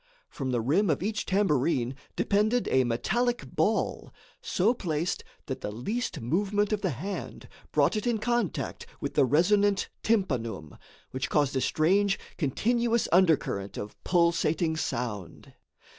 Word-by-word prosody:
From 135 -3 -4
the 120 -2 +1
rim 165 - +2
of 150 +2 +1
each 215 +1 -2
tambourine 145 -9 +1 0.2
depended 215 +4 +1
a 130 -1 +4
metallic 240 - -1
ball, - - 0 0.3
so 210 +6 +2
placed 170 -6 -2 0.2
that - - -5
the 105 - -4
least 210 - -3
movement 205 - 0
of 210 - -1
the 190 - 0
hand 180 - -5 0.2
brought - - +3
it 215 +2 -2
in 235 -2 +2
contact 240 -4 -2
with - - -4
the 140 - +4
resonant 200 +8 +3
tympanum, 120 - -1 0.4
which 130 +1 -3
caused 145 -3 +1
a 130 - +1
strange, 195 +8 +2 0.2
continuous 235 - +1
undercurrent 160 - +2
of 105 - -6
pulsating 170 -2 +2
sound. 115 - -4
170 Hz, 135 wpm, -28 LUFS, 130-210 Hz, 0.4 s, a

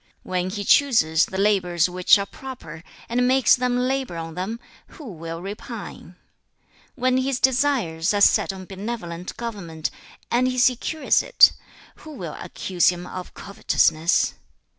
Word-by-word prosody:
When 185 0 -2
he 205 +1 -4
chooses 200 - +3
the 190 - -6
labours 185 -4 +2
which 180 +3 +4
are 200 - -3
proper, 195 -11 -10 0.2
and 245 +1 +1
makes 260 -2 +5
them 250 0 -1
labour 255 -6 -1
on 165 0 -6
them, 190 +7 -4 0.4
who 305 - -10
will 165 0 -7
repine? 200 +3 -8 0.8
When 255 0 +1
his 260 -1 -1
desires 245 - +1
are 205 - 0
set 200 - +4
on 190 -1 -9
benevolent 190 -3 -6
government, 185 -9 -5 0.4
and 250 +2 +2
he 255 0 -2
secures 255 +5 +2
it, - - +6 0.5
who 310 - -12
will 170 - -7
accuse 180 -2 -1
him 180 0 +1
of 180 0 -8
covetousness? 170 -4 +1
200 Hz, 140 wpm, -23 LUFS, 175-250 Hz, 0.8 s, it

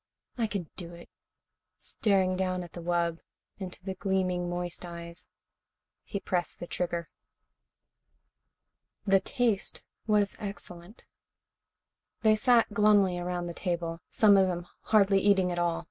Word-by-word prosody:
I 230 -3 0
can 200 -6 -4
do 175 -2 -7
it." 170 - -14 0.7
Staring 190 -3 +1
down 185 -1 -1
at 175 - -12
the 175 - -7
wub, 170 -1 0 0.4
into 180 -2 -7
the 190 0 -3
gleaming, 185 -2 -1
moist 175 0 -4
eyes, 170 -1 -8 0.7
he 200 - -5
pressed 180 -2 -2
the - - -5
trigger. 170 -1 -3 1.9
The 195 -1 +5
taste 230 -1 -1 0.2
was 210 -2 +2
excellent. 195 -1 -8 1.2
They 215 -1 +6
sat 230 -1 +3
glumly 205 -3 +4
around 175 0 -3
the 170 - -5
table, 170 -2 -3
some 205 -2 +5
of 190 -1 +5
them 175 -1 -3 0.2
hardly 200 -2 +4
eating 195 -2 +3
at 175 - -2
all. 170 -1 +1
185 Hz, 130 wpm, -29 LUFS, 175-200 Hz, 1.9 s, They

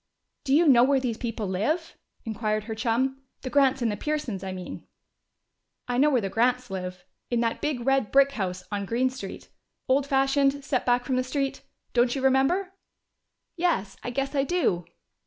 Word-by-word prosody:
"Do 270 - +3
you 330 +2 +5
know 245 -4 +7
where 270 +1 +4
these 240 -4 -3
people 230 -3 -3
live?" 265 - -1 0.3
inquired 215 -1 -1
her 220 +1 -5
chum. 250 +5 0 0.2
"The 255 - -4
Grants 270 -3 +3
and 230 - +1
the - - -2
Pearsons, 280 -9 -3
I 190 - -4
mean?" 185 -1 -8 1.0
"I 245 0 0
know 295 +2 +5
where 260 -4 +3
the 195 - -2
Grants 245 +3 +1
live: 180 -1 -5 0.2
in 240 - +1
that 230 -1 -1
big 275 -6 -2
red 270 -5 +2
brick 275 0 +5
house 185 -7 -3
on 200 -1 -2
Green 255 +4 +1
Street. 250 -7 -8 0.4
Old 270 +2 +2
fashioned, 275 +1 +2
set 255 -3 -1
back 245 0 +2
from 260 - 0
the 255 - +1
street. 275 +1 -2 0.3
Don't 240 +1 +3
you 265 - -3
remember?" 270 +9 +2 0.8
"Yes, 330 - 0
I - - -3
guess 275 +3 -2
I 275 -2 +2
do." 275 - 0
255 Hz, 185 wpm, -26 LUFS, 220-275 Hz, 1.0 s, know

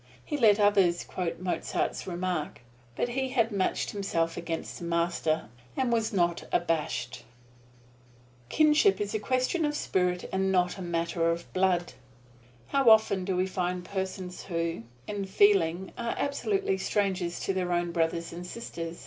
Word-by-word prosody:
He - - -3
let 220 -6 +5
others 195 -4 +4
quote 170 -2 -4
Mozart's 185 +1 -2
remark; 175 -5 -3 0.3
but 245 - -1
he 265 +2 -1
had 230 -3 +1
matched 195 -2 0
himself 170 -5 -1
against 165 -1 -5
the - - -8
Master, 170 -3 0 0.3
and 255 -3 +1
was 225 -1 +1
not 175 -4 +1
abashed. 150 -8 -1 1.3
Kinship 310 +6 +4
is 205 0 -2
a 215 - 0
question 255 +9 0
of 295 -1 0
spirit 180 -7 0
and 190 0 +1
not 180 +1 +1
a - - -5
matter 170 -1 0
of 170 +1 -3
blood. 185 -2 +1 0.8
How 275 -3 +4
often 215 -4 +5
do 190 -1 -1
we 185 +1 +2
find 180 -1 -2
persons 190 -1 -5
who, 165 -5 -2 0.2
in 205 -1 -3
feeling, 190 -2 +3
are 235 0 -2
absolutely 285 - 0
strangers 190 -4 -1
to 195 - -1
their 180 -1 -1
own 175 0 0
brothers 165 0 -1
and 175 +1 -6
sisters! 170 -6 -6
185 Hz, 150 wpm, -28 LUFS, 170-205 Hz, 1.3 s, let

